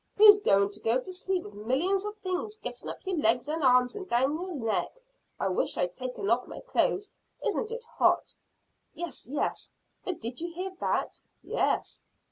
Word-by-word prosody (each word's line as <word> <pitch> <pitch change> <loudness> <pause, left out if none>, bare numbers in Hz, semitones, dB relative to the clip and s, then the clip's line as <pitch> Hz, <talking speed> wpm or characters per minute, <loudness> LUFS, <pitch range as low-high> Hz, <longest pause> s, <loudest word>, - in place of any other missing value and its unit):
Who's 415 0 +10
to 200 - +3
go 230 +3 +3
to 370 +8 -7
sleep 370 0 -1
with 205 - -10
millions 280 - 0
of 420 +1 -5
things 385 +2 -3
getting 480 - -6
up - - -8
your 375 -2 -1
legs 240 -1 +3
and 310 +1 -2
arms 250 -1 +5
and 390 -2 -6
down 260 +4 +3
your 355 +2 -4
neck? 225 -5 0 0.5
I - - +1
wish 185 - 0
I'd 180 0 0
taken 250 -5 -4
off 235 +3 +2
my - - -8
clothes. 415 -4 0 0.3
Isn't 440 - 0
it 470 +1 -5
hot!" 465 - +2 0.6
"Yes, 335 -7 -6
yes; 290 - -2 0.3
but 365 -3 -3
did 235 +2 -5
you 340 0 -3
hear 375 +2 -3
that?" - - -1 0.2
"Yes." - - 0
310 Hz, 180 wpm, -29 LUFS, 240-380 Hz, 0.6 s, Who's